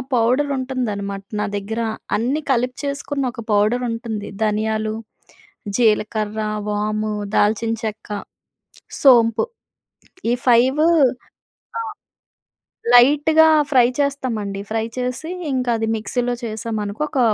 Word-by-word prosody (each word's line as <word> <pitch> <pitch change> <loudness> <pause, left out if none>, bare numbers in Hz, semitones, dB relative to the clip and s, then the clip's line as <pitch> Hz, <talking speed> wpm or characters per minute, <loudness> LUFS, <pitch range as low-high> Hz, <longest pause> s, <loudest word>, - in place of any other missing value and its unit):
Powder 250 +5 +2
ఉంటుందన్నమాట 210 -7 -3 0.2
నా 210 - 0
దగ్గర. 210 +3 -4 0.4
అన్నీ 255 +8 0
కలిపి 250 0 0
చేసుకున్న 280 0 -2
ఒక 230 - -7
పౌడర్ 210 +4 +2
ఉంటుంది. 230 -3 -5
ధనియాలు, 215 0 0 0.8
జీలకర్ర, 215 -2 +1 0.3
వాము, 215 +1 -1 0.2
దాల్చిన 220 +2 +2
చెక్క, 220 -1 -5 0.9
సోంపు, 235 - +5 0.9
ఈ - - +3
5 255 +4 +4 1.0
ఆ! - - -1 1.1
లైట్‌గా 295 +6 +6 0.2
ఫ్రై 250 -3 +6
చేస్తామండి. 245 -8 -1
ఫ్రై 225 0 0
చేసి, 250 +5 -3 0.2
ఇంక 255 -1 -1
అది 225 0 -1
మిక్సీలో 245 +3 -1
చేశామనుకో 215 +1 -3
ఒక 270 - -2
230 Hz, 100 wpm, -20 LUFS, 215-255 Hz, 1.1 s, లైట్‌గా